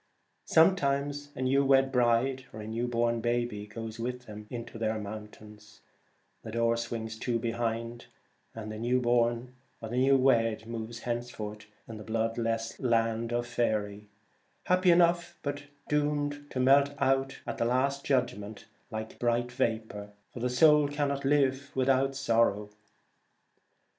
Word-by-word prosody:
Some 165 +4 +6
times 145 -1 -1
a 130 - -3
new 135 +2 +3
wed 135 -1 +4
bride 125 +2 +2
or 110 - -9
a 105 - -7
new 115 +2 -2
born 115 -1 0
baby 120 -3 -1
goes 115 +1 -7
with 125 +1 -4
them 105 -1 -10
into 115 -1 -7
their 110 0 0
mountains; 105 0 -10 0.6
the - - -9
door 115 +1 +1
swings 115 -1 -5
to 120 0 0
behind, 115 0 -3 0.5
and 110 -1 -6
the 110 - -6
new 125 +2 +1
born 120 0 +1 0.3
or 110 - -7
the 120 - -3
new 135 +1 +5
wed 115 -4 +2
moves 115 0 -6
henceforth 120 -3 -5 0.2
in 115 - -8
the 105 - -8
bloodless 115 +1 -2
land 115 -1 +1
of 120 0 0
Faery; 105 -4 -2 0.5
happy 185 0 +3
enough, 170 0 +3
but 145 -1 -4 0.2
doomed 145 -1 -1
to 130 - -4
melt 140 +2 +4
out 135 0 +1
at - - -5
the - - +2
last 135 +3 +1
judg 130 -6 +1
ment 105 +1 -9 0.2
like 110 0 -6
bright 120 0 0
vapour, 110 -5 -2 0.2
for - - -7
the 125 +1 0
soul 150 +3 +5
can 145 0 -1
not 140 0 -3
live 140 -1 +2
without 135 +1 +2
sorrow. 115 -5 +1
120 Hz, 155 wpm, -29 LUFS, 115-135 Hz, 0.6 s, Some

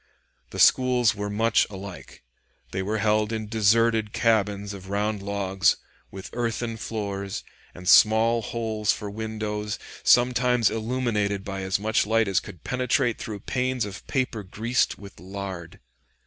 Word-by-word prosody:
The - - -8
schools 125 -2 +4
were 105 -1 -4
much 110 +2 +2
alike. 95 -2 -10 0.5
They 95 - -2
were 105 +3 -1
held 105 0 +1
in 110 -1 -3
deserted 110 0 +2
cabins 105 -3 +1
of 95 -1 -10
round 105 +1 -1
logs, 95 -4 +1 0.3
with 95 0 -9
earthen 115 -1 -2
floors, 100 -3 -4 0.3
and 90 +1 -9
small 115 +3 +6
holes 110 -2 -1
for 105 -2 -4
windows, 105 -1 -4 0.2
sometimes 125 -1 +4
illuminated 110 -4 -1
by 95 -1 -4
as 95 0 0
much 110 0 +1
light 115 0 +2
as 95 - +2
could 85 - -12
penetrate 125 -1 0
through 105 -3 -6
panes 130 0 -1
of 100 -1 -9
paper 125 -5 -1
greased 110 +6 -1
with 100 -4 -12
lard. 95 -2 -7
105 Hz, 140 wpm, -25 LUFS, 100-115 Hz, 0.5 s, small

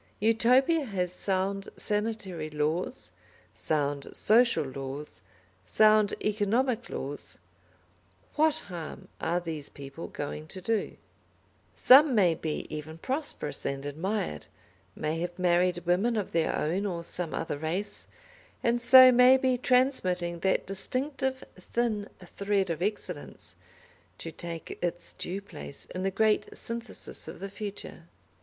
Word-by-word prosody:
Utopia 250 +8 +4
has 180 -5 -2
sound 195 +1 -1
sanitary 205 -7 -2
laws, 155 - -2 0.4
sound 145 -2 -1
social 235 -2 +4
laws, 135 -5 -7 0.4
sound 215 - +4
economic 225 +4 +1
laws; 140 +2 -6 1.0
what 310 0 +4
harm 175 -4 -8
are 170 +2 0
these 160 -4 -6
people 140 +3 -9
going 150 +1 -6
to 190 - -8
do? 220 +3 -1 0.8
Some 270 +1 +7
may 185 -6 +5
be 160 -1 -4
even 155 +1 -7
prosperous 265 - -3
and 140 0 -3
admired, 160 - -3 0.5
may 155 +2 -2
have 175 +1 -4
married 175 -1 +2
women 195 +7 +2
of 205 - -2
their 165 -1 +1
own 185 +7 0
or 170 -3 -4
some 170 -1 -4
other 150 -3 -3
race, 170 +7 -4 0.6
and 240 0 +2
so 255 +1 +10
may 250 +1 +7
be 260 -1 +2
transmitting 185 -10 +1
that 190 +2 +1
distinctive 260 +6 -2 0.2
thin 215 +1 -2
thread 195 +1 -1
of 165 0 -4
excellence, 185 -5 -4 0.6
to 165 - -7
take 165 0 -7
its 175 0 -2
due 190 +3 -4
place 155 -7 -9
in 185 - -3
the 195 - +1
great 210 +1 +1
synthesis 235 +1 -3
of - - -8
the 195 - -5
future. 200 -4 -7
190 Hz, 125 wpm, -29 LUFS, 165-225 Hz, 1.0 s, so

